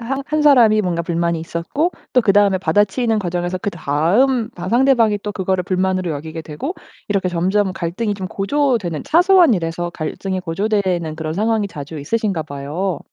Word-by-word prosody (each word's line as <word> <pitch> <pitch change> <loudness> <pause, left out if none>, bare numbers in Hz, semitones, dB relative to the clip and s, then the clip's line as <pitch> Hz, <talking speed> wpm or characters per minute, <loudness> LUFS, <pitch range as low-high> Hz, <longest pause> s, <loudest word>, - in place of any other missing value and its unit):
한 270 +4 -3
한 305 0 0
사람이 235 -7 +6
뭔가 175 -3 -1
불만이 170 0 -1
있었고 170 - -2 0.2
또 250 - +5
그다음에 200 -2 +3
받아치는 205 +6 +1
과정에서 175 -1 -2
그다음 200 - +1
바 175 +1 -7
상대방이 235 -2 +3
또 210 - -4
그거를 190 -1 -1
불만으로 185 -1 0
여기게 160 +2 -6
되고 165 - -5 0.3
이렇게 195 -3 0
점점 185 +3 0
갈등이 190 +5 -2
좀 190 -2 -5
고조되는 205 - -1
사소한 355 - +5
일에서 175 -1 -3
갈등이 185 +4 -4
고조되는 185 -3 -1
그런 155 -1 -4
상황이 215 +3 0
자주 155 -3 -8
있으신가 195 +2 -1
봐요. 150 +5 -4
190 Hz, 395 characters per minute, -19 LUFS, 170-220 Hz, 0.3 s, 사람이